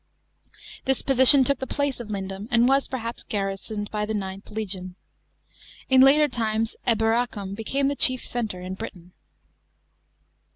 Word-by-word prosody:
This 265 -1 0
position 265 +1 +7
took 280 0 +1
the 265 - -5
place 285 -2 -2
of 240 - -7
Lindum, 195 0 -5
and 240 0 +3
was, 275 +1 +2
perhaps 235 -2 -5
garrisoned 205 +1 -5
by 210 -1 -2
the 220 - -3
IXth 195 -1 -6
legion. 190 -4 -4 1.0
In 260 0 +6
later 290 +3 +5
times 225 -3 -2
Elmracum 225 -3 0
became 265 +6 -2
'.he 285 - -1
chief 255 -2 +4
centre 220 -7 -4
in 185 +1 -6
Britain. 185 -4 -9
225 Hz, 140 wpm, -24 LUFS, 200-260 Hz, 1.0 s, position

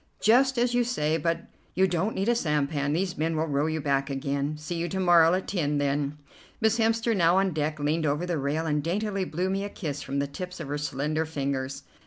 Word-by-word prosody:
"Just 260 +4 +4
as 240 0 +2
you 245 0 +3
say; 160 -10 0
but 165 +1 -1 0.3
you 190 +1 +4
don't 180 +4 -1
need 195 +2 -1
a 240 - +4
sampan, 150 -7 0
these 180 +1 -1
men 160 +1 0
will 160 - +1
row 145 0 0
you 160 0 -1
back 140 -1 0
again. 140 +2 -2
See 150 +3 -5
you 170 +1 -2
to 190 - -2
morrow 175 -2 +5
at 185 - -3
ten, 150 -6 0
then." 145 +1 0 0.4
Miss 220 +1 +2
Hemster, 225 0 +2
now 175 -1 +4
on 195 0 +2
deck, 155 0 -2
leaned 155 +2 0
over 150 +5 0
the 175 -3 -1
rail 145 +4 -1
and 150 -2 +1
daintily 195 +3 -1
blew 180 +3 -2
me 195 +1 -1
a 205 - -4
kiss 150 -8 -5
from 140 - -4
the 140 - +1
tips 180 +6 -7
of 155 -4 -6
her 145 +1 -2
slender 150 +2 -1
fingers. 135 -2 -3
160 Hz, 230 wpm, -27 LUFS, 145-190 Hz, 0.4 s, morrow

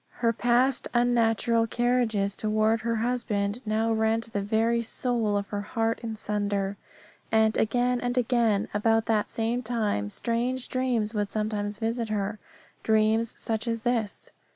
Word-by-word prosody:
Her 230 - +4
past 245 +3 +2
unnatural 230 -1 +2
carriages 230 -5 0
toward 215 +1 +1
her 230 +1 -1
husband 225 -2 -1
now 220 +1 +1
rent 220 +1 0
the 205 - 0
very 225 +3 +1
caul 230 -2 +1
of 200 0 -4
her 205 -1 -3
heart 225 +2 -1
in 225 -2 -4
sunder. 205 -2 -2 0.6
And, 220 -1 +3
again 245 +2 +1
and 245 +1 -2
again, 235 -4 +2
about 225 +2 +2
that 215 -2 +1
same 230 +2 -1
time 215 - -1
strange 240 - -1
dreams 245 -4 0
would 205 -2 -1
sometimes 210 -1 -2
visit 230 0 -2
her. 210 0 -2 0.4
Dreams 220 +1 +2
such 225 +1 -2
as 230 -1 -2
this. 230 -4 -1
225 Hz, 145 wpm, -27 LUFS, 210-235 Hz, 0.6 s, Her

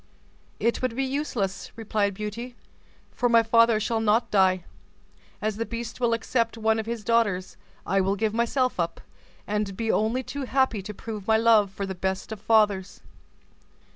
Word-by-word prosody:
"It 230 +3 0
would 255 -3 -1
be 270 - 0
useless," 260 -8 -2
replied 210 -3 -1
Beauty, 220 +4 -6 0.6
"for 245 - 0
my 230 -1 +5
father 230 0 +4
shall 225 +1 -1
not 220 +2 +2
die. 185 -3 +3 0.8
As 215 -1 -1
the 230 - -1
beast 235 0 -6
will 240 -2 +2
accept 230 0 0
one 220 0 +1
of 220 - -4
his 230 -2 -4
daughters, 205 -5 +1 0.3
I 195 +1 +2
will 195 +1 +1
give 215 +1 -1
myself 235 +1 0
up, 170 -1 -1 0.5
and 205 -2 -2
be 225 -1 0
only 225 +4 +1
too 280 +2 -5
happy 260 -5 +1
to 210 +3 -7
prove 210 -2 -7
my 220 0 +5
love 220 -3 +4
for 195 +1 -5
the 190 - -4
best 190 +3 -3
of 215 -2 -6
fathers." 210 -3 +2
220 Hz, 170 wpm, -26 LUFS, 200-235 Hz, 0.8 s, my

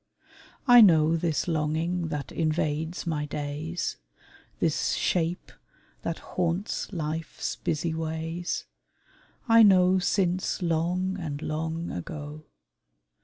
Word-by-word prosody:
I 245 -1 +9
know 165 -5 +6
This 165 -1 -1
longing 165 +2 0
that 150 -3 -4
invades 155 +1 -1
my 150 -3 -2
days; 150 +4 -4 0.6
This - - +1
shape 175 0 -1 0.5
that 165 - -3 0.2
haunts 180 +4 -1
life's 160 -2 -3
busy 160 +1 -1
ways 160 +2 -3 0.8
I 230 0 +7
know 185 -3 +6
since 185 0 0
long 180 +3 0
and 150 -4 -4
long 160 +2 -3
ago. 150 - -7
165 Hz, 100 wpm, -27 LUFS, 155-180 Hz, 0.8 s, I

